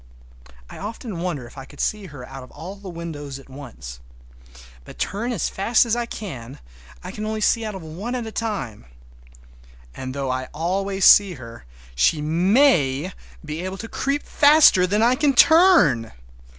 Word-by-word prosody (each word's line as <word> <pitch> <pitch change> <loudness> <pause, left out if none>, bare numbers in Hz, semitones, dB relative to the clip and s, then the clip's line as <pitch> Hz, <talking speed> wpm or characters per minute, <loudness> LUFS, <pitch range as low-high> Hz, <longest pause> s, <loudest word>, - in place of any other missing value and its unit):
I - - -11
often 215 -2 -6
wonder 170 -8 -3
if 120 +3 -12
I 135 - -9
could 145 - -17
see 210 -2 -2
her 140 -6 -10
out 135 0 -9
of 125 - -13
all 185 +5 -9
the 200 -1 -10
windows 155 -5 -7
at 135 - -16
once. 110 - -10 0.8
But, - - -13
turn 230 +5 -3
as 215 -9 -1
fast 220 +5 +2
as 230 -1 0
I 240 -1 -2
can, 135 - -8 0.5
I - - -7
can 210 - -7
only 215 0 -3
see 230 +2 +2
out 215 -2 -5
of 190 - -8
one 185 +11 -6
at 245 - -3
one 220 -1 -8
time. 190 - -4 1.1
And 130 0 -7
though 135 -2 -2
I 130 0 -3
always 190 +4 -1
see 200 -3 +7
her 115 - -12 0.3
she 60 - +2
may 170 - +2 0.3
be 155 +2 -5
able 190 +1 -5
to 225 - -7
creep 275 +5 -2
faster 290 -11 +5
than 210 +4 +1
I 240 +2 +4
can 280 0 +1
turn! 280 - +5
185 Hz, 175 wpm, -22 LUFS, 135-220 Hz, 1.1 s, see